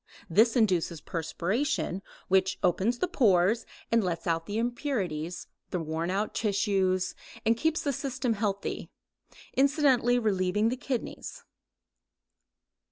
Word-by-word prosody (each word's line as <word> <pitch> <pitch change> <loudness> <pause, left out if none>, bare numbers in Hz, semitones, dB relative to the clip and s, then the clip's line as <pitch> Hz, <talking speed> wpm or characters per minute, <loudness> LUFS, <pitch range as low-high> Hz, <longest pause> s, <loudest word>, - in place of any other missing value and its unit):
This 225 +6 +5
induces 180 -8 +2
perspiration, 190 - -2 0.3
which 190 0 +2
opens 190 +7 +2
the 365 - 0
pores 215 - +3 0.2
and 230 -1 +4
lets 175 -2 -2
out 165 -1 0
the 205 - -2
impurities, 205 - -2 0.2
the 180 - -2
worn 160 +1 -2
out 200 +3 -1
tissues, 195 -3 +1 0.3
and 225 +1 +4
keeps 320 +6 0
the 285 - 0
system 260 -2 -1
healthy, 200 -2 -2 0.6
incidentally 270 -3 +3
relieving 210 -1 +1
the 250 - -1
kidneys. 260 -2 -5
210 Hz, 115 wpm, -29 LUFS, 180-245 Hz, 0.6 s, This